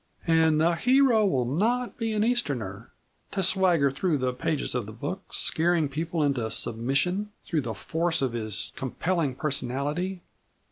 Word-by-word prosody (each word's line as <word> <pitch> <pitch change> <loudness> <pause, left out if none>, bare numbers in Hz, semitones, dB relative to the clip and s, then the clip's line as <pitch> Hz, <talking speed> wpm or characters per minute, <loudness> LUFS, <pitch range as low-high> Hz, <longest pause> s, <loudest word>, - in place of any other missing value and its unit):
"And 160 -2 +4
the 165 +2 +3
hero 250 +1 +4
will 130 -9 +1
not 230 - 0
be 225 -1 -2
an 210 0 +1
Easterner 125 - -1 0.4
to 195 - -2
swagger 175 -6 +3
through 150 +4 0
the 130 -1 -1
pages 145 +4 -2
of 120 -5 -2
the - - -7
book, 150 - -6
scaring 165 -1 +2
people 160 +2 -2
into 130 -6 0
submission 135 - 0 0.2
through 160 -4 0
the 115 -4 -4
force 165 - -1
of 130 -3 -1
his 110 -3 -2
compelling 150 +1 -1
personality. 150 +6 -2
155 Hz, 150 wpm, -27 LUFS, 130-185 Hz, 0.4 s, And